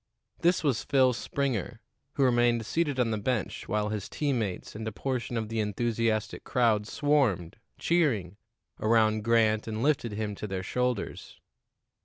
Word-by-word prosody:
This 175 +1 +2
was 135 -7 +1
Phil 130 -2 +3
Springer, 120 -3 -2 0.3
who 140 - +1
remained 120 -2 +3
seated 145 +1 0
on 120 -2 +2
the 110 - -1
bench 110 -2 -2
while 105 0 0
his 105 -2 -4
team 140 -5 0
mates 100 -5 -4
and 110 +1 -6
a - - -2
portion 120 0 -3
of 110 -1 -2
the 115 +1 -3
enthusiastic 110 +1 -1
crowd 115 -5 +2
swarmed, 130 - +1 0.2
cheering, 115 - +1 0.4
around 110 -1 +3
Grant 110 -1 +3
and 110 +1 -3
lifted 135 -7 +1
him 105 0 -3
to 105 - -5
their 95 -2 -3
shoulders. 125 +2 -3
115 Hz, 155 wpm, -28 LUFS, 105-130 Hz, 0.4 s, Phil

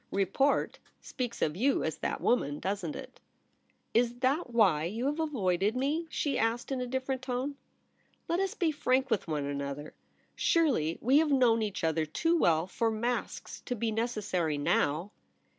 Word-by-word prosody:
' - - -41
Report 270 +9 +1 0.2
speaks 245 -3 -4
of 150 - 0
you 265 +8 +2
as - - -3
that - - -2
woman, 145 - +1
doesn't 190 -5 -3
It - - -9 0.2
?' - - -43
* - - -44
Is 240 +1 +2
that 270 +3 +1
why 195 -10 +3
you 220 +8 -3
have 295 +3 0
avoided 210 - 0
me 295 +6 0
?' - - -31
she 290 -2 -1
asked, 230 +3 0
In 260 -1 -1
a 250 - -2
different 260 +1 -2
tone. 260 +2 -3 0.3
* - - -40
Let 340 +2 0
us 390 -1 -1
be 335 -3 +1
frank 265 -3 +1
with 195 - 0
one 150 -3 -1
another. 140 +1 -4 0.4
Surely 250 - +2
we 265 +5 +5
have 315 -1 +2
known 245 -5 +4
each 210 -5 -3
other 160 -1 +1
too 330 - +1
well 165 - +3
for 225 +5 0
masks 235 +3 -3
to 250 - -2
be 225 0 -1
necessary 210 -9 -1
now.' 150 +5 +1
235 Hz, 185 wpm, -30 LUFS, 175-270 Hz, 0.4 s, we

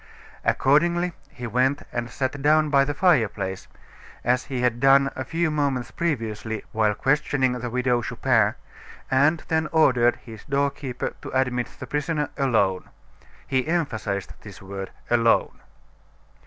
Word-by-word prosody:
Accordingly, 170 +5 +2 0.2
he 120 - -8
went 130 +5 +1
and 120 0 -3
sat 135 +3 -3
down 155 +1 +3
by 140 -1 +5
the 145 +1 -3
fireplace 110 - +1 0.6
as 125 +1 +1
he 130 -3 -3
had 120 -1 +1
done 135 +1 +5
a 130 - -3
few 165 +2 -1
moments 140 -5 -1
previously 110 -8 -3
while 110 -1 +1
questioning 135 0 +1
the 125 -1 -4
Widow 125 0 +1
Chupin - - +1 0.6
and 145 +5 +3
then 160 -2 +1
ordered 125 -7 +4
his 110 -3 -12
door 140 0 +1
keeper 130 -4 -5
to - - -7
admit 125 -2 0
the - - -6
prisoner 150 0 -2
alone. 110 -9 +1 0.6
He 130 +1 0
emphasized 115 - -2
this 100 -3 -11
word 95 0 -7 0.2
"alone." 115 -1 +2
130 Hz, 140 wpm, -24 LUFS, 120-145 Hz, 0.6 s, by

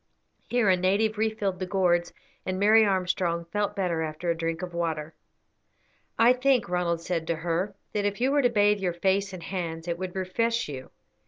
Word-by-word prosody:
Here 245 -3 +2
a 185 - +5
native 205 +4 +1
refilled 215 -4 -1
the 185 - -3
gourds, 175 -2 +1 0.3
and 185 0 -3
Mary 215 +2 +6
Armstrong 180 -3 0
felt 205 +4 -2
better 180 -5 -1
after 160 +2 -2
a - - -1
drink 165 +1 -3
of 180 -1 -6
water. 160 -2 -2 1.0
"I 235 +2 +6
think," 255 -2 +2
Ronald 175 -1 -1
said 170 -1 -3
to 165 - 0
her, 175 +4 -2 0.2
"that 210 - 0
if 205 +1 -1
you 260 +3 +2
were 290 0 +3
to 245 - +3
bathe 205 -2 +3
your 180 -3 -1
face 195 +3 0
and 185 -3 -8
hands 165 -2 -4
it 170 0 -2
would 185 -1 -5
refresh 230 +5 0
you. 130 -3 -7
185 Hz, 190 wpm, -27 LUFS, 170-205 Hz, 1.0 s, Mary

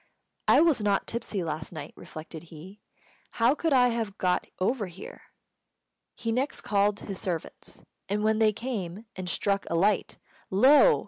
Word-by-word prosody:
"I - - +6
was 320 -8 +3
not 205 -1 +1
tipsy 225 -5 -3
last 155 -1 -4
night," 160 - -8
reflected 160 +1 -10
he; 170 +6 -12 0.5
"how 235 +3 +4
could 325 +1 -1
I 250 -2 +5
have 225 -4 -3
got 180 -1 +1
over 205 +2 0
here?" 180 +1 -10 0.9
He 230 -1 -3
next 260 +5 -1
called 205 0 +1
his 195 -2 -6
servants, 170 -4 -5 0.3
and 210 +1 0
when 220 0 +2
they 220 -1 +5
came 210 -4 -5
and 185 -1 -4
struck 200 +1 0
a 170 - -1
light, 195 +4 +1 0.3
lo! 280 - +6
205 Hz, 155 wpm, -28 LUFS, 185-235 Hz, 0.9 s, I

